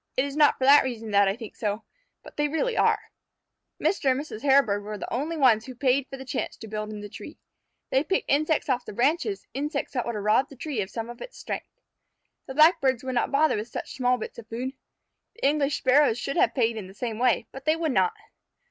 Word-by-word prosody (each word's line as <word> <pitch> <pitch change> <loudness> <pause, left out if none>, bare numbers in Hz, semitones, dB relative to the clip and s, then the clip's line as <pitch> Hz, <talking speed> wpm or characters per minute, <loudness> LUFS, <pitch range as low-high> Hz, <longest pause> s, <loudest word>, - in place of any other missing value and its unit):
"It 260 - +3
is 280 0 -6
not 300 -1 +5
for - - -4
that 285 +2 +8
reason 225 -4 -5
that 200 0 +5
I 195 - +1
think 225 -2 -10
so, 210 0 -2 0.4
but - - -13
they 295 0 +1
really 390 +12 -1
are." - - +1 0.7
Mr. 330 -8 +1
and 260 +1 +2
Mrs. 285 -7 -7
Hairbird 265 -7 +3
were 210 +1 -6
the - - -6
only 305 +7 -2
ones 235 -6 +4
who 255 - -8
paid 265 +1 +1
for 270 - -8
the 265 - -9
chance 245 - -3
to 225 - -9
build 215 0 -4
in 210 -1 -7
the 205 - -6
tree. - - -10 0.5
They 265 - +3
picked 380 +5 -1
insects 305 +2 +1
off 255 -3 0
the - - -8
branches, 320 - 0
insects 285 +1 -3
that 245 -3 -2
would 235 - -2
have 205 - -4
robbed 215 +6 +3
the 275 - -12
tree 260 -3 -3
of 190 - -4
some 225 0 -5
of 240 0 -10
its - - -9
strength. - - -5 0.8
The 265 - -7
Blackbirds 305 -5 +4
would 260 0 -3
not 245 - 0
bother 300 +3 +3
with 210 +2 -4
such - - -6
small 250 -1 +1
bits 235 - -7
of 225 - -12
food. 250 +4 -4 0.6
The - - -4
English 285 -1 +1
Sparrows 260 -2 +4
should 275 +3 -3
have - - +2
paid 230 -3 +1
in 200 -4 -6
the 190 - -14
same 230 -2 -4
way, 245 -2 +2
but 270 +1 -10
they 310 +1 +3
would 325 -2 -1
not. 440 - +2
260 Hz, 240 wpm, -26 LUFS, 225-290 Hz, 0.8 s, that